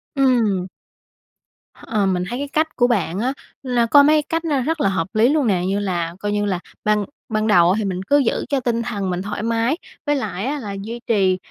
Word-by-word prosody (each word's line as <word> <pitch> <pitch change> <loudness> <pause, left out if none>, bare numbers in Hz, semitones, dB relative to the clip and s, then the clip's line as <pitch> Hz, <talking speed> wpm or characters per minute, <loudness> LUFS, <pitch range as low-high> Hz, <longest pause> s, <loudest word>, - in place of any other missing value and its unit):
Ừm. 230 -9 +2 1.1
H - - -19
ờ, 210 -3 +1
mình 185 -2 0
thấy 245 +2 -4
cái 285 - -3
cách 315 +1 0
của 245 -1 +3
bạn 195 -6 0
á 255 +4 0 0.3
là 245 -3 +1
có 285 +5 +6
mấy 305 +1 +4
cách 330 +3 -3
nó 285 -5 +1
rất 320 +4 -1
là 195 - +3
hợp 185 -3 -1
lý 225 +3 +4
luôn 295 -3 +2
nè, 185 -4 +2
như 195 +1 0
là 175 -4 -2
coi 205 +1 -2
như 205 0 0
là 190 -3 -1 0.2
ban 210 -1 +1 0.2
ban 215 -1 0
đầu 175 -4 +5
á - - +2
thì 215 - -1
mình 185 -1 -3
cứ 285 +9 +3
giữ 270 -5 0
cho 280 - +1
tinh 235 -2 -1
thần 205 -5 -3
mình 180 0 -2
thoải 205 +2 -4
mái, 230 +6 +1 0.3
với 290 -1 +2
lại 210 -6 -3
á 290 +3 -2
là 205 -6 -6
duy 230 +4 -6
trì 190 -4 +2
220 Hz, 240 wpm, -21 LUFS, 195-265 Hz, 1.1 s, có